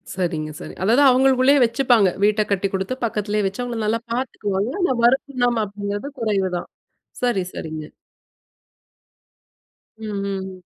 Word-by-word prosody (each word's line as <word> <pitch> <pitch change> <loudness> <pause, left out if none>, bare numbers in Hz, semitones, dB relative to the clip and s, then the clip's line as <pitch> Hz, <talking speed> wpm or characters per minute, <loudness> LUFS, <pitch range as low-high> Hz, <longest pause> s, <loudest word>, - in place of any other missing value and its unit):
சரிங்க, 165 -4 -2
சரி. - - -8
அதாவது 240 +8 +4
அவங்களுக்குள்ளேயே 265 +2 +4
வச்சுப்பாங்க. 230 -4 +3
வீட்ட 210 +1 +3
கட்டி 195 0 +1
குடுத்து 190 +6 -2
பக்கத்திலேயே 210 -1 -1
வச்சு 195 +6 -5
அவங்கள 240 -2 -4
நல்லா 225 +2 +1
பாத்துக்குவாங்க. 210 -4 -2
ஆனா, 310 -7 +2
வருமானம் 245 -2 +2
அப்டிங்கிறது 205 +5 -4
குறைவுதான். 195 -5 -1 0.5
சரி, 235 -7 +1
சரிங்க. 155 -1 -6 2.1
ம். 220 -1 -7 0.2
ம். 190 -1 -5
210 Hz, 115 wpm, -22 LUFS, 195-245 Hz, 2.1 s, அதாவது